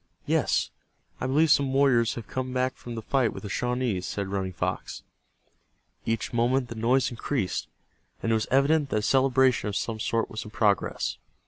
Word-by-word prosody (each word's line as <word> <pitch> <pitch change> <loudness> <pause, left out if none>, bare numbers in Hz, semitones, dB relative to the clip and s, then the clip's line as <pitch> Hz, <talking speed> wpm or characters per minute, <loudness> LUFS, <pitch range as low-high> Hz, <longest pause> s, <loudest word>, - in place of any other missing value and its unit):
"Yes, - - +1 0.5
I 130 - -2
believe 150 +4 +3
some 140 -1 +4
warriors 130 -4 +3
have 115 - -6
come 130 +3 -4
back 130 0 0
from 120 -1 -8
the 115 - -5
fight 130 -1 +1
with - - -8
the 105 - -5
Shawnees," 125 -7 -1
said 100 -1 -3
Running 95 -1 -2
Fox. 85 - -4 1.0
Each 115 +1 -1
moment 120 +2 +1
the - - -5
noise 120 +4 +2
increased, 120 -3 -2 0.6
and 115 - +1
it - - +4
was 110 -1 0
evident 140 +2 +3
that - - -1
a - - +1
celebration 130 -2 +3
of 100 - -4
some 110 0 -2
sort 115 +1 0
was 110 - -6
in 105 - -10
progress. 105 -2 0
120 Hz, 185 wpm, -27 LUFS, 110-130 Hz, 1.0 s, some